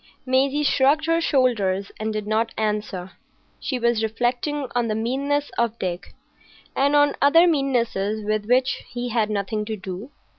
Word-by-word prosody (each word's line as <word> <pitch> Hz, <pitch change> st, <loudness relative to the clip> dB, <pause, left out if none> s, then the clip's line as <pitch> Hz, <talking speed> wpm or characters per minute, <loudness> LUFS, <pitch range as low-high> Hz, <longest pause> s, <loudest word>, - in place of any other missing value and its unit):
Maisie 270 Hz, +3 st, +2 dB
shrugged 285 Hz, +2 st, +3 dB
her 330 Hz, +1 st, +2 dB
shoulders 210 Hz, -, +1 dB
and 220 Hz, 0 st, -2 dB
did 215 Hz, -1 st, -3 dB
not 220 Hz, +2 st, 0 dB
answer. 210 Hz, -4 st, -2 dB, 0.5 s
She 260 Hz, -, -2 dB
was 235 Hz, -2 st, +1 dB
reflecting 245 Hz, +6 st, -1 dB
on 240 Hz, -1 st, +1 dB
the 215 Hz, -, -1 dB
meannesses 280 Hz, +6 st, -1 dB
of 235 Hz, -1 st, 0 dB
Dick, 180 Hz, -1 st, -5 dB, 0.6 s
and 285 Hz, +2 st, +2 dB
on 290 Hz, 0 st, +4 dB
other 330 Hz, +5 st, +6 dB
meannesses 235 Hz, -, 0 dB
with 215 Hz, 0 st, -1 dB
which 255 Hz, +2 st, +2 dB
he 245 Hz, 0 st, -4 dB
had 220 Hz, -2 st, +1 dB
nothing 210 Hz, +1 st, -2 dB
to 220 Hz, 0 st, -3 dB
do. 190 Hz, +5 st, -7 dB
235 Hz, 155 wpm, -23 LUFS, 215-275 Hz, 0.6 s, other